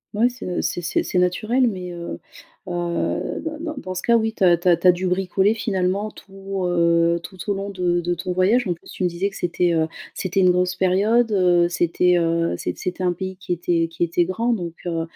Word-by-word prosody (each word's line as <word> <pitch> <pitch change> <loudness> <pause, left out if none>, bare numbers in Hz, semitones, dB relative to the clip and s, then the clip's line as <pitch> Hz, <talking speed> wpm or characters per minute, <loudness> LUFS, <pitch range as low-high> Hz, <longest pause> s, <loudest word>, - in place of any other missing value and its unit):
Ouais 225 +4 +4
c'est, 250 0 -7
heu, 180 - -1
c'est 175 - -2
c'est 175 - 0
c'est 180 - 0
naturel, 215 +8 +2
mais 185 -5 -4
heu 170 0 -6 0.5
heu, 175 -1 -2
dans 310 -1 -5
dans 315 -1 -5
dans 185 -8 -5
ce 185 - -4
cas, 235 0 +4
oui, 220 0 -1
tu - - -1
as 175 -2 +6
tu 175 - -4
as 175 - +7
tu 170 +2 +1
as - - +10
dû 180 +1 -3
bricoler, 190 +3 +2
finalement, 200 -2 -1
tout, 195 -1 -7
heu, 170 -1 +2
tout 190 +2 -11
au - - +3
long 195 +1 -4
de 180 -2 0
de 175 +1 -1
ton 180 +2 -4
voyage. 200 +7 +3
En 180 - 0
plus, 170 - -17
tu - - -4
me - - +4
disais 175 +4 -2
que 195 - -15
c'était, 175 0 0
heu, 160 -1 +2 0.3
c'était 190 +1 -1
une 185 -1 +5
grosse 180 0 +1
période, 205 +6 +2
heu, 175 -3 +3
c'était, 175 +1 +2
heu, 165 - +1
c'é 90 - -3
c'était 180 0 -4
un 180 -1 +2
pays 185 +1 -6
qui 180 -1 -3
était 170 -1 0
qui 165 +1 -3
était 170 +1 +1
grand 225 +7 -1
donc, 175 -6 -4
heu 165 -1 -1
180 Hz, 235 wpm, -22 LUFS, 175-195 Hz, 0.5 s, as